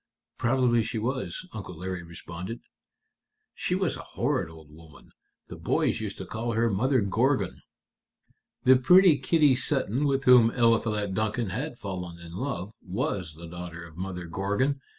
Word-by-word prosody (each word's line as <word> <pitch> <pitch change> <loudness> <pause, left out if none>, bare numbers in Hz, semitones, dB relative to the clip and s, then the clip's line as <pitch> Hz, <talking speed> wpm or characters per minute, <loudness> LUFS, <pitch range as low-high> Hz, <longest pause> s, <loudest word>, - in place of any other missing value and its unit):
"Probably 120 -1 +3
she 115 - -3
was," 130 +9 -3
Uncle 95 -5 -7
Larry 90 +1 -4
responded. 85 +5 -8 0.9
"She - - -1
was - - 0
a - - -7 0.2
horrid - - 0
old 80 -2 -14
woman. 80 0 -16 0.4
The - - -8
boys - - 0
used - - -5
to - - -6
call 115 +1 -3
her 115 +1 +2
Mother 130 +6 +2
Gorgon." 105 0 +1 1.0
"The 130 0 +7
pretty 180 +3 +6
Kitty 150 -5 +4
Sutton 135 0 0
with 135 -1 +1
whom 125 -3 +7
Eliphalet 115 -4 +2
Duncan 110 0 -1
had 125 - -4
fallen 90 -5 -6
in 85 -1 -11
love 105 -4 -4
was 95 - -3
the 85 +2 -10
daughter 85 0 -7
of 80 -2 -14
Mother 90 0 -5
Gorgon. 105 +11 -1
110 Hz, 150 wpm, -27 LUFS, 90-130 Hz, 1.0 s, The